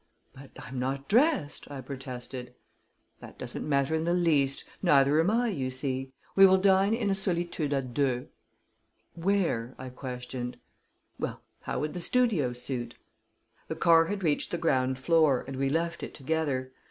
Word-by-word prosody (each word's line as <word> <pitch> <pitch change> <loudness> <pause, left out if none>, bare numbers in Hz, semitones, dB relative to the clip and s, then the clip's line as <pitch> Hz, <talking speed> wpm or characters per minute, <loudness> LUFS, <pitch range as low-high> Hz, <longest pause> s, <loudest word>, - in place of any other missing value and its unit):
"But 135 0 -13
I'm 130 0 -7
not 135 +2 -2
dressed," 240 - +2
I 140 -2 -6
protested. 125 -1 -7 0.6
"That - - -12
doesn't - - -5
matter 140 +1 +2
in 160 0 +1
the 170 +1 +1
least 150 -6 +2 0.2
neither 145 -4 +4
am 165 +4 +3
I, 235 +2 +2
you 135 -10 -2
see. 130 0 -3 0.2
We 195 0 +9
will 190 0 +5
dine 195 +2 +4
in 215 -4 0
a - - +3
solitude 175 -5 -1
à 140 -1 0
deux." 130 -3 0 0.9
"Where?" 170 -10 0
I 130 0 -7
questioned. 125 -1 -6 0.6
"Well, - - -4 0.2
how - - -3
would 150 0 -2
the 175 - -5
Studio 205 - +2
suit?" 120 -1 -4 0.7
The - - -4
car 165 -1 +5
had 195 +2 -4
reached 150 -3 +1
the 175 - -2
ground 130 -5 +1
floor, 155 -1 +3
and 135 - -5
we 135 0 +1
left 170 +3 -1
it - - -7
together. 135 -3 -1
145 Hz, 165 wpm, -29 LUFS, 130-175 Hz, 0.9 s, We